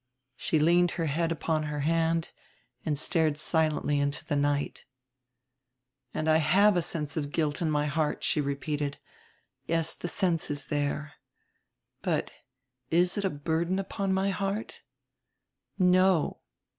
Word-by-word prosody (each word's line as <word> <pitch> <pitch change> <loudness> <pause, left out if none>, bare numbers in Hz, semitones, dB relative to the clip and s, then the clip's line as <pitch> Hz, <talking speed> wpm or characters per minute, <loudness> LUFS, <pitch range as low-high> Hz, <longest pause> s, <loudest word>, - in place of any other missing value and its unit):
She 160 - 0
leaned 175 +3 +4
her 165 - 0
head 165 +3 0
upon 160 -1 0
her 150 -1 -3
hand 165 +2 +1 0.5
and 150 -2 -1
stared 155 -1 +1
silently 155 -2 +1
into 140 0 -1
the 145 - -1
night. 145 0 -1 1.3
"And 155 - -3
have 165 +6 +4
a 175 - +3
sense 150 -3 -3
of 145 -3 -3
guilt 150 -1 -1
in 165 - +1
my 150 -1 +1
heart," 150 +1 -1
she 150 - +2
repeated. 145 +1 -2 0.7
"Yes, 165 0 +1
the - - -6
sense 175 -3 0
is 145 -1 -4
there. 145 +1 -1 0.9
But - - -1 0.6
is 175 +2 +2
it 205 - -1
a - - +2
burden 165 +4 -1
upon 195 0 -2
my 190 +1 +1
heart? 200 +3 -3 1.0
No. 185 -2 +3
160 Hz, 135 wpm, -28 LUFS, 150-175 Hz, 1.3 s, leaned